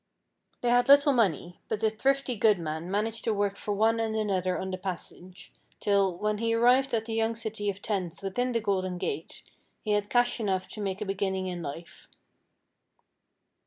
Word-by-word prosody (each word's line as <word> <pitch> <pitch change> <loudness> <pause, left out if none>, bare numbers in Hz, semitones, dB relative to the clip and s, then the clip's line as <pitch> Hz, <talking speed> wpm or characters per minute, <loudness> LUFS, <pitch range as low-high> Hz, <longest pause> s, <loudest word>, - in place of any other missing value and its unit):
They 245 - +1
had 245 0 +4
little 285 0 +7
money, 180 - 0
but 220 - -1
the 220 0 +2
thrifty 270 +3 0
good 215 -1 +4
man 160 +1 -4
managed 220 +3 -1
to 225 - +1
work 200 -1 0
for 205 0 -3
one 225 +2 +2
and 220 -1 -1
another 190 -4 0
on 190 - -4
the 185 - -3
passage, 185 0 -8 0.3
till, 195 -3 +2
when 210 +1 -1
he 230 0 +1
arrived 250 +2 +4
at 220 -1 -1
the 225 - -4
young 225 0 +1
city 220 -2 -3
of 195 0 -5
tents 190 -4 -3
within 245 +6 -1
the 230 -1 0
Golden 185 -3 -1
Gate, 165 -4 -5 0.4
he 215 - -2
had 205 0 +1
cash 245 0 +2
enough 190 -4 -1
to 215 - -7
make 195 0 -3
a - - -1
beginning 190 -1 -1
in 180 -2 -4
life. 165 +2 -8
205 Hz, 190 wpm, -28 LUFS, 185-225 Hz, 0.4 s, little